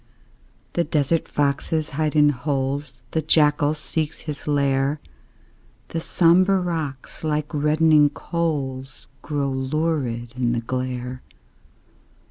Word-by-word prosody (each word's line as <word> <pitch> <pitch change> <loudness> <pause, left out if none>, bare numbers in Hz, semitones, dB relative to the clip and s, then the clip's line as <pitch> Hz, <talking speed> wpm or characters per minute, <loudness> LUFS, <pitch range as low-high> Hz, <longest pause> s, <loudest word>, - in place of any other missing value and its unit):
The 170 - +2
desert 155 0 0
foxes 145 +2 0
hide 155 +1 -1
in 150 -1 +6
holes, 135 -1 -2
The 160 - 0
jackal 150 -1 +3
seeks 155 0 -3
his 150 -1 -6
lair; 140 0 +1 0.9
The 165 - -3
sombre 185 +4 +4
rocks, 160 -8 -4
like 150 0 -1
reddening 150 0 +4
coals, 140 -6 -3
Glow 145 -3 -1
lurid 130 -4 -1
in 120 -2 0
the 120 - -1
glare. 125 +1 -4
145 Hz, 105 wpm, -23 LUFS, 135-155 Hz, 0.9 s, in